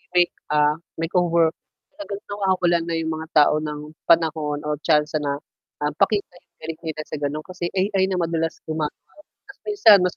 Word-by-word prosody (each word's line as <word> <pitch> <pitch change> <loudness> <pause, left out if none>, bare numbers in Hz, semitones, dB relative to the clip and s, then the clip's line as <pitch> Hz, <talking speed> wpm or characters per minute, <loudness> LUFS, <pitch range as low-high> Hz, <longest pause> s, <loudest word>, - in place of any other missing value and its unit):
make 175 -1 +5 0.2
ah, 150 +1 +2 0.2
makeover. 170 0 +2 0.4
Talagang 210 -10 -6
nawawalan 185 -4 +1
na - - 0
yung 160 0 -2
mga 160 +1 -6
tao 150 -1 +6
ng 150 0 -6
panahon 155 -3 +2
o 150 - 0
tsansa 150 -1 +2
na, 140 -1 -1 0.5
ah, 150 - +1
pakita 200 -1 +1
yung - - -53
galing 160 0 -5
nila 155 -1 -4
sa - - -5
ganon, 145 +2 -2
kasi 180 -2 -4
AI 195 0 +1
na 185 - 0
madalas 165 -1 -1
gumagawa, 155 -1 -1 0.6
'tas 400 - -13
minsan 410 - +7
mas 180 0 +1
165 Hz, 170 wpm, -23 LUFS, 150-185 Hz, 0.6 s, minsan